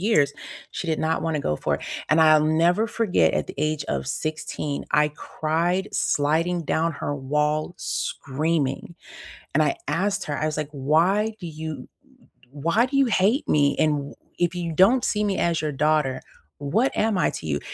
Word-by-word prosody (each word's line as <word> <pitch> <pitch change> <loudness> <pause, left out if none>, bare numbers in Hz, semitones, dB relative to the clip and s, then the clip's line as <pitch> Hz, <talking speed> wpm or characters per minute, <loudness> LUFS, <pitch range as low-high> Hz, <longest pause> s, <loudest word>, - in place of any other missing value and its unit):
years." 165 -9 +3 0.4
She - - -5
did 160 -1 0
not 160 +1 0
wanna 160 -2 -1
go 75 - -1
for - - -1
it. - - -13 0.3
And 155 +1 +4
I'll 155 -1 +6
never 170 +7 +3
forget 185 - +1
at 75 - -1
the - - -7
age 155 0 -1
of - - -2
16 150 0 -3
I 150 0 +4
cried 165 +5 -2
sliding 165 +4 +1
down 165 +3 0
her 145 - -2
wall 150 +4 -1
screaming, 145 +2 -2 0.6
and - - +4
I 340 - +1
asked 200 +2 0
her, 145 - -3
I 155 - 0
was 155 - -2
like, 150 -1 -3
"Why 170 +10 +2
do 175 - -6
you 155 -4 -7 0.6
why 170 - +1
do 275 - -3
you 275 - +5
hate 225 +4 +2
me? 145 -1 +3
And 150 -3 0
wh - - -20 0.2
if 175 0 +1
you 170 -2 -3
don't 200 +10 +4
see 210 - 0
me 200 -2 0
as 170 -1 +1
your 155 - -1
daughter, 150 -1 +1 0.4
what 200 - +1
am 220 -1 +1
I - - +2
to - - -7
you?" - - -1
155 Hz, 185 wpm, -24 LUFS, 150-180 Hz, 0.6 s, I'll